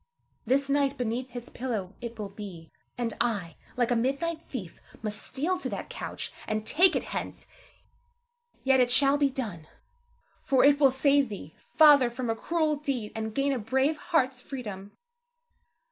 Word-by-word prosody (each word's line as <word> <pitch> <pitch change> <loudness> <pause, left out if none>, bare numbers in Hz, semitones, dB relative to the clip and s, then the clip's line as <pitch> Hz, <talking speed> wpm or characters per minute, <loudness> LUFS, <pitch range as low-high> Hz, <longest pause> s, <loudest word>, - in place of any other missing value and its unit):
This 270 +3 +2
night 280 0 +1
beneath 245 +2 -2
his 245 -1 -8
pillow 220 -7 -4
it 235 -1 -6
will 210 -2 -5
be; 190 -6 -9 0.3
and 235 -2 -2
I, 200 -9 -1 0.2
like 245 -1 +1
a - - +4
midnight 280 +7 -1
thief, 215 - -8 0.2
must 210 -1 -3
steal 335 +8 -1
to - - -4
that - - -5
couch, - - -6
and 215 0 -2
take 360 +9 +5
it - - 0
hence. - - -5 1.2
Yet, 265 0 +4
it 250 -1 +4
shall 275 +3 +4
be 285 -1 +4
done, 210 - -5 0.8
for 265 -1 +4
it 285 0 +5
will 275 -2 +7
save 275 0 +3
thee, 175 -7 -8 0.2
Father, 290 -5 +7
from 240 -1 -3
a - - -1
cruel 310 +4 0
deed, 270 -7 -3
and 220 -1 -4
gain 275 0 +2
a 260 - -1
brave 265 +7 +1
heart's 265 -8 0
freedom. 205 -8 -7
255 Hz, 165 wpm, -28 LUFS, 220-280 Hz, 1.2 s, will